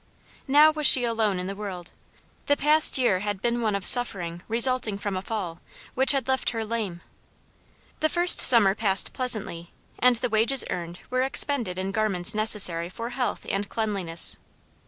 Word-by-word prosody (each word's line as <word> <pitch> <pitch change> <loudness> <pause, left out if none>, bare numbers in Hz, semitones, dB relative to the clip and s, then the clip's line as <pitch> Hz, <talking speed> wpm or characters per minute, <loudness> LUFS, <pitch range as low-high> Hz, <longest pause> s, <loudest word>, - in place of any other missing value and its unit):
Now 295 +3 +4
was 305 -2 +1
she 255 - +6
alone 225 -4 -2
in 180 - -6
the 195 +1 -7
world. 190 -4 -8 0.6
The 285 - +1
past 305 0 +4
year 240 -8 0
had 205 0 -5
been 240 +3 -3
one 215 -3 -2
of 200 - -6
suffering 175 -9 +2
resulting 235 -2 0
from 200 -1 -6
a 185 - -5
fall, 190 -6 -7 0.3
which 265 +1 +2
had 275 -3 -2
left 265 0 -1
her 225 -2 -5
lame. 210 -6 -6 1.0
The 315 - -1
first 350 +1 +5
summer 225 -6 +7
passed 195 -2 -1
pleasantly, 205 -9 -4 0.3
and 250 0 +2
the 245 +1 -3
wages 225 +5 +2
earned 175 0 -8
were 255 0 -1
expended 260 -7 -3
in 190 +1 -5
garments 200 -4 -1
necessary 200 -6 +3
for 230 +5 -8
health 250 0 -5
and 200 +1 -4
cleanliness. 195 -7 -4
215 Hz, 170 wpm, -23 LUFS, 190-250 Hz, 1.0 s, summer